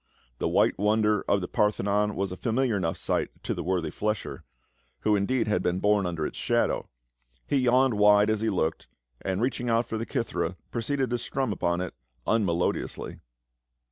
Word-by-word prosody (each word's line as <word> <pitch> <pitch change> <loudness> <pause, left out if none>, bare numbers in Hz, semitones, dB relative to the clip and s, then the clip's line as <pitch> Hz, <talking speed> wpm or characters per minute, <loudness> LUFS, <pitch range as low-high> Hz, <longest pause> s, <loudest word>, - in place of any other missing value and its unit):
The - - 0
white - - +2
wonder 105 0 +2
of 100 - +2
the 90 - -3
Parthenon 105 -1 +1
was 95 -1 -2
a - - -4
familiar 120 +3 0
enough 85 -4 -1
sight - - -1
to - - -1
the - - -4
worthy 90 -4 -1
flesher, 105 0 -3 0.6
who 105 -1 +3
in 100 -1 0
deed 130 -3 +1
had 105 - +1
been 90 +1 0
born 105 -1 +2
under 85 -3 -2
its - - -5
shadow; - - 0 0.6
he 140 - +1
yawned 130 0 +4
wide 105 0 +5
as 110 -1 0
he 110 - +1
looked, 80 -5 -1 0.3
and 95 +3 -1
reaching 125 -1 -1
out 115 +1 +2
for 110 - -4
the 115 - -4
kithera 115 - -2
proceeded 130 +2 -1
to 120 - 0
strum 130 -2 -1
upon 85 -1 0
it 90 - -4 0.3
unmelodiously. 90 -6 -1
105 Hz, 180 wpm, -27 LUFS, 95-115 Hz, 0.6 s, wide